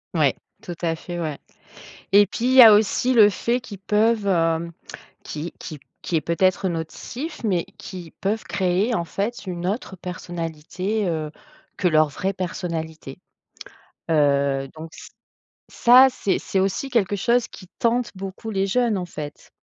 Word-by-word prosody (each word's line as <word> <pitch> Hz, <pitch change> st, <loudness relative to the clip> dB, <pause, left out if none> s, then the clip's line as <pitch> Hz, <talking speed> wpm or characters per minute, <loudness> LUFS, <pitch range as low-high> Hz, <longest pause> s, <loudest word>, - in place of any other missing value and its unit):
Ouais, -, -, +3 dB, 0.3 s
tout 175 Hz, -, -7 dB
à 165 Hz, -1 st, +1 dB
fait, 175 Hz, +2 st, -7 dB
ouais. 155 Hz, -4 st, -4 dB, 0.7 s
Et 205 Hz, +1 st, +6 dB
puis 230 Hz, +5 st, -4 dB
il 255 Hz, -, +3 dB
y 260 Hz, -, +10 dB
a 225 Hz, -, +11 dB
aussi 215 Hz, +4 st, +3 dB
le 210 Hz, -3 st, +7 dB
fait 240 Hz, +5 st, -1 dB
qu'ils 205 Hz, -6 st, -10 dB
peuvent, 210 Hz, +1 st, +1 dB
hem, 165 Hz, -2 st, +1 dB, 0.5 s
qui 155 Hz, +3 st, -6 dB
qui 155 Hz, -4 st, -8 dB, 0.2 s
qui 170 Hz, -, -2 dB
est -, -, +2 dB
peut-être 185 Hz, +3 st, +1 dB
nocif 240 Hz, -, -6 dB
mais 185 Hz, -6 st, +1 dB
qui 180 Hz, -4 st, -9 dB
peuvent 210 Hz, +3 st, -1 dB
créer, 190 Hz, +5 st, 0 dB
en 170 Hz, -6 st, -1 dB
fait, 205 Hz, +7 st, -4 dB
une 175 Hz, -1 st, -4 dB
autre 195 Hz, -1 st, -3 dB
personnalité, 180 Hz, +3 st, -4 dB
heu, 155 Hz, -3 st, -2 dB, 0.5 s
que 180 Hz, -, +2 dB
leur 155 Hz, -2 st, +4 dB
vraie 190 Hz, +7 st, -2 dB
personnalité. 165 Hz, -6 st, -5 dB, 0.9 s
Heu, 140 Hz, -2 st, +2 dB
donc 160 Hz, +1 st, -9 dB
ç -, -, -11 dB, 0.6 s
ça, 255 Hz, +2 st, +6 dB
c'est 200 Hz, -, -1 dB
c'est 190 Hz, -, -2 dB
aussi 195 Hz, +8 st, -1 dB
quelque 205 Hz, -4 st, +1 dB
chose 235 Hz, +4 st, +1 dB
qui 185 Hz, -, -13 dB
tente 235 Hz, 0 st, +1 dB
beaucoup 195 Hz, +3 st, -7 dB
les 195 Hz, -1 st, 0 dB
jeunes, 235 Hz, -1 st, +1 dB
en 180 Hz, -, -4 dB
fait. 150 Hz, -3 st, -8 dB
185 Hz, 160 wpm, -23 LUFS, 165-215 Hz, 0.9 s, a